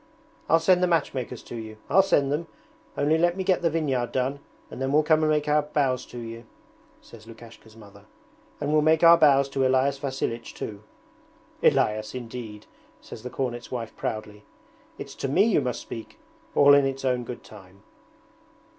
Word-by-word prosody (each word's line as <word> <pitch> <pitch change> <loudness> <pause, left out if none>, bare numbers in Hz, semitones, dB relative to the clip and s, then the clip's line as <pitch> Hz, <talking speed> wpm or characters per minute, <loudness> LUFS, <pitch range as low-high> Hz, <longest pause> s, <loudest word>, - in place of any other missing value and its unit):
'I'll 165 - +5
send 180 +2 +3
the 180 - +3
matchmakers 145 -7 -2
to - - -9
you 110 -1 -8
I'll 195 - +5
send 140 -7 +1
them! 160 +3 -2 0.5
Only 155 +3 +2
let 175 +2 +2
me 190 - -2
get 185 -1 +1
the 170 - +2
vineyard 140 -7 -1
done 130 +2 -1 0.3
and - - -8
then 135 0 -1
we'll 150 +2 +4
come 155 0 +3
and 155 - +2
make 150 -1 +1
our 150 0 +3
bows 140 -4 -1
to 125 - -11
you,' 115 0 -8 0.6
says 110 -1 -15
Lukashka's 115 -1 -14
mother. 100 -1 -16 0.5
'And 145 +1 -2
we'll 155 - +4
make 160 +2 +3
our 170 0 +9
bows 140 -4 +4
to 135 -1 -1
Elias 135 +1 +1
Vasilich 130 -4 -4
too.' 105 -2 -7 0.8
'Elias, 110 +2 +1
indeed!' 115 -3 -8 0.3
says - - -11
the 125 - -7
cornet's 120 -2 -4
wife 115 -3 -6
proudly. 105 -1 -5 0.5
'It's - - -8
to - - -4
me 170 +9 +3
you 225 - +2
must 125 -1 -3
speak! 115 - -9 0.4
All 145 0 +7
in 140 -1 +5
its 135 0 -5
own 125 -1 0
good 120 +1 -8
time.' 100 -2 -16
135 Hz, 180 wpm, -25 LUFS, 115-150 Hz, 0.8 s, our